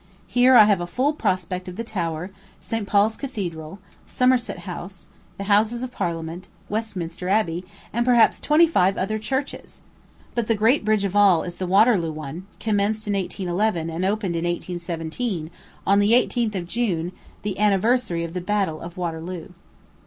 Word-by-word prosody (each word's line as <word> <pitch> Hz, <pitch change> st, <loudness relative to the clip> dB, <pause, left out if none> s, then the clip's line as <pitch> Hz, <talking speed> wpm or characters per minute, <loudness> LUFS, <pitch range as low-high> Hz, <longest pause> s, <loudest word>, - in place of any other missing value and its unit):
Here 250 Hz, +1 st, +4 dB
I 220 Hz, -, +10 dB
have 205 Hz, -4 st, +3 dB
a 175 Hz, -, -3 dB
full 260 Hz, -, +1 dB
prospect 185 Hz, -, -2 dB
of 180 Hz, -, -7 dB
the 230 Hz, -, -4 dB
Tower, 175 Hz, -4 st, -3 dB, 0.3 s
St. 225 Hz, -3 st, -4 dB
Paul's 210 Hz, +2 st, +3 dB
Cathedral, 180 Hz, -, -5 dB, 0.3 s
Somerset 255 Hz, -1 st, +1 dB
House, 180 Hz, 0 st, -7 dB, 0.3 s
the 200 Hz, -, -4 dB
Houses 215 Hz, +4 st, +2 dB
of 255 Hz, -, -5 dB
Parliament, 170 Hz, -3 st, -4 dB, 0.2 s
Westminster 185 Hz, -5 st, -4 dB
Abbey, 180 Hz, -4 st, +1 dB, 0.3 s
and 235 Hz, +2 st, +1 dB
perhaps 240 Hz, -2 st, +4 dB
twenty 305 Hz, +3 st, +5 dB
five 195 Hz, -, +2 dB
other 215 Hz, +3 st, -1 dB
churches! 265 Hz, +6 st, -4 dB, 0.5 s
But 235 Hz, -2 st, -1 dB
the 225 Hz, -, +2 dB
great 225 Hz, +6 st, +3 dB
bridge 215 Hz, -1 st, +2 dB
of 200 Hz, 0 st, -2 dB
all 200 Hz, -5 st, +5 dB
is 175 Hz, -1 st, -7 dB
the 185 Hz, -, -3 dB
Waterloo 195 Hz, -3 st, +4 dB
one, 155 Hz, +4 st, -7 dB
commenced 215 Hz, 0 st, 0 dB
in 205 Hz, -, -1 dB
1811, 185 Hz, -2 st, -1 dB
and 165 Hz, +3 st, -3 dB
opened 195 Hz, -2 st, 0 dB
in 165 Hz, -, -1 dB
1817, 175 Hz, +1 st, -3 dB, 0.3 s
on 200 Hz, +1 st, +4 dB
the 205 Hz, +2 st, +4 dB
18th 240 Hz, -3 st, +2 dB
of 175 Hz, -2 st, -3 dB
June, 180 Hz, -6 st, -1 dB, 0.3 s
the 205 Hz, -1 st, -3 dB
anniversary 210 Hz, -2 st, +2 dB
of 170 Hz, 0 st, -5 dB
the 180 Hz, -, -3 dB
battle 190 Hz, -4 st, -1 dB
of 170 Hz, +2 st, -9 dB
Waterloo. 170 Hz, 0 st, -4 dB
195 Hz, 165 wpm, -23 LUFS, 175-220 Hz, 0.5 s, I